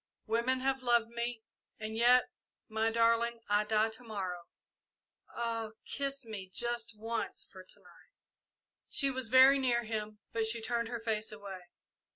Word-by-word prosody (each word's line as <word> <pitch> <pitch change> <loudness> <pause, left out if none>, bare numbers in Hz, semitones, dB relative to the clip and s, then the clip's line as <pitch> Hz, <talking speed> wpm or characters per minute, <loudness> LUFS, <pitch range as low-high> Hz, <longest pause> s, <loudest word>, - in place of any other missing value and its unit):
Women 235 +3 +1
have 265 0 0
loved 240 -2 +3
me, 235 -1 -3 0.4
and 220 0 -4
yet 245 +2 +5 0.4
My 220 0 +1
darling, 230 +1 +2
I 205 +1 +3
die 215 +1 +2
to 225 +3 -10
morrow 185 -6 -4 0.8
ah, 230 -2 -3
kiss 275 -2 -2
me 200 -4 -7
just 235 0 -2
once 225 +2 -2
for 185 -1 -11
to 185 - -10
night!" - - -20 0.8
She 275 -1 +1
was 260 -3 -3
very 260 +2 +8
near 240 -2 +2
him, 215 -1 -4 0.2
but 225 -1 +1
she 230 +1 +2
turned 235 +1 -1
her 235 -1 -4
face 220 -1 -1
away. 195 -4 -9
230 Hz, 155 wpm, -33 LUFS, 215-240 Hz, 0.8 s, very